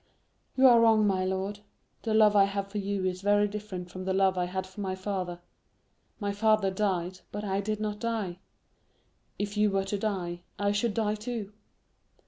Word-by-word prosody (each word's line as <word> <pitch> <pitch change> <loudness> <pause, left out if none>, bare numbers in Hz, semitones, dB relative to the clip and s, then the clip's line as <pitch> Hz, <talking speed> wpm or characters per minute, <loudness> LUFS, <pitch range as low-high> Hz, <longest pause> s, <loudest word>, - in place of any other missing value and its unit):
"You 265 - +6
are 240 -3 +8
wrong, 220 -2 +5
my 190 -2 +2
lord. 190 +2 -2 0.4
The 220 -2 0
love 215 -1 +6
I 200 -1 +7
have 200 0 -3
for 205 +1 -3
you 200 -1 -2
is 185 0 -2
very 205 +1 +3
different 200 -4 -6
from 185 - -6
the 190 0 0
love 190 -1 +3
I 180 -1 0
had 185 +1 -3
for 190 +2 -9
my 190 -1 -2
father. 185 -2 -3 0.8
My 205 -2 -1
father 215 -1 +2
died, 185 -2 -1
but 205 +1 -5
I 195 -1 0
did 215 +1 -2
not 210 -1 -3
die. 215 -7 -2 1.0
If 205 0 -3
you 210 0 +4
were 195 -1 0
to 200 +1 -2
die, 180 -5 -2 0.2
I 200 0 +1
should 205 +1 0
die 215 -2 +1
too." 215 -1 -5
200 Hz, 190 wpm, -29 LUFS, 190-210 Hz, 1.0 s, are